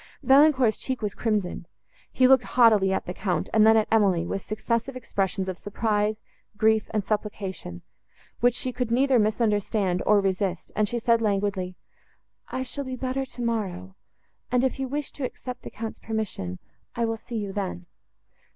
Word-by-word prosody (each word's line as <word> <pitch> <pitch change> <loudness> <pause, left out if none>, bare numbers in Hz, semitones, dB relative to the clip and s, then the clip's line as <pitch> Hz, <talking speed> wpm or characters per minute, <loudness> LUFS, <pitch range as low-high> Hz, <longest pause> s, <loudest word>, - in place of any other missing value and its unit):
Valancourt's 270 -4 +5
cheek 260 -3 -4
was 205 -2 -1
crimsoned: 205 -6 -2 0.4
he 255 - +4
looked 265 -1 +6
haughtily 215 -6 +4
at 190 - -1
the 180 - -4
Count, 185 -1 -2
and 215 0 +6
then 220 0 +7
at 215 - +2
Emily, 195 -6 +3
with 195 - -3
successive 230 +5 -2
expressions 195 -6 -2
of 185 -2 -4
surprise, 210 0 0 0.4
grief 220 0 +3
and 210 -2 -1
supplication, 200 - -4 0.6
which 245 0 +3
she 255 - -2
could 250 -1 -2
neither 255 +1 +3
misunderstand, 210 -3 +1
nor 210 -1 +6
resist, 190 -2 -1
and 210 -1 +1
she 240 - -2
said 230 -1 +2
languidly—"I 200 +4 -4
shall 280 +2 -5
be 260 -1 -5
better 260 +1 -2
tomorrow, 215 - -3 0.6
and 250 0 +3
if 265 0 0
you 265 - -1
wish 290 +2 -3
to 285 - -7
accept 250 0 -5
the - - -8
Count's 225 0 -6
permission, 210 - -4 0.4
I 235 - +1
will 225 0 -1
see 235 +1 -6
you 200 -2 -4
then." 185 -3 -4
220 Hz, 165 wpm, -26 LUFS, 195-245 Hz, 0.6 s, then